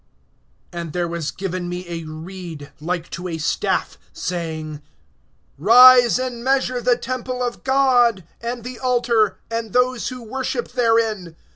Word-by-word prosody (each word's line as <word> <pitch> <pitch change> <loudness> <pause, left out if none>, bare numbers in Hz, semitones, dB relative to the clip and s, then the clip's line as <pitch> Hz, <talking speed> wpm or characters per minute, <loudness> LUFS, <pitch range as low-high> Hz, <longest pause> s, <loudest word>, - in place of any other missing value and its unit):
AND 170 -3 -5
there 175 -1 -1
was 170 -3 -3
given 185 -2 -4
me 180 +1 -5
a 170 -1 -5
reed, 160 -2 -8
like 170 +1 -3
to 180 +1 -5
a 165 -2 -4
staff, 155 - -1
saying: 160 -4 -4 0.8
Rise, 245 - +8
and 250 -2 -4
measure 260 -1 +1
the 245 0 +3
temple 255 0 -4
of 245 -1 -4
God, 250 -6 +3 0.2
and 235 0 -4
the 250 0 -7
altar, 235 -4 +2
and 230 -2 -3
those 250 0 +1
who 255 -2 -6
worship 250 +1 -3
therein. 225 -8 +1
225 Hz, 140 wpm, -21 LUFS, 175-250 Hz, 0.8 s, Rise